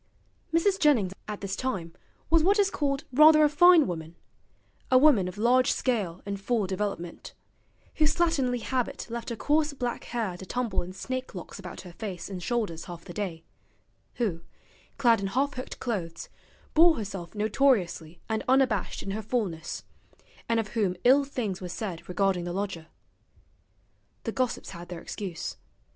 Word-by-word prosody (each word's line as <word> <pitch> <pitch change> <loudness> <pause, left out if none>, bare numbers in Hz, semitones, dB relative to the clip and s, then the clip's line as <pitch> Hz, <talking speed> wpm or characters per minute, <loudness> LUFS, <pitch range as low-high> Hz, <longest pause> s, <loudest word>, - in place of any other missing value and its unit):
Mrs. 375 +4 +2
Jennings 235 - +3
at 210 -1 -5
this 195 -1 -3
time 190 -11 -3 0.4
was 330 -1 +6
what 395 +6 +4
is 400 -1 +3
called 280 0 -1
rather 305 +2 +8
a - - +7
fine 345 +2 +7
woman: 165 -2 -5 0.7
a 255 - +6
woman 255 -9 +5
of 180 +2 -7
large 245 +3 +4
scale 205 -9 -1
and 200 -1 -4
full 225 -1 +1
development; 190 -3 -4 0.6
whose 305 -1 +3
slatternly 275 -8 +1
habit 255 -2 -2
left 235 +1 -4
her 235 - -3
coarse 300 +4 +1
black 245 -3 -3
hair 220 -7 -3
to 190 - -9
tumble 245 -5 -1
in 175 - -7
snake 255 +5 -5
locks 180 +2 -8
about 180 -3 -8
her 180 - -11
face 190 -1 -6
and 185 -2 -5
shoulders 205 -7 -2
half 170 -2 -9
the 175 - -8
day; 175 -6 -4 0.7
who, 195 -9 -1 0.6
clad 235 -6 +4
in 195 - -1
half 270 +8 0
hooked 255 0 -7
clothes, 175 -9 -4 0.4
bore 330 +1 +7
herself 195 -5 -6
notoriously 205 - +1
and 220 -1 -1
unabashed 260 -2 +2
in 195 - -4
her 215 +2 -3
fullness; 205 -8 -3 0.7
and 230 0 +3
of 215 -2 -2
whom 200 -6 0
ill 270 +3 +6
things 225 -9 -3
were 180 - -5
said 180 -3 -5
regarding 190 -1 +1
the 175 - -4
lodger. 190 -4 -3 1.4
The 225 - -2
gossips 255 0 -2
had 170 0 -9
their 175 -2 -6
excuse. 185 -4 -5
220 Hz, 165 wpm, -28 LUFS, 185-260 Hz, 1.4 s, rather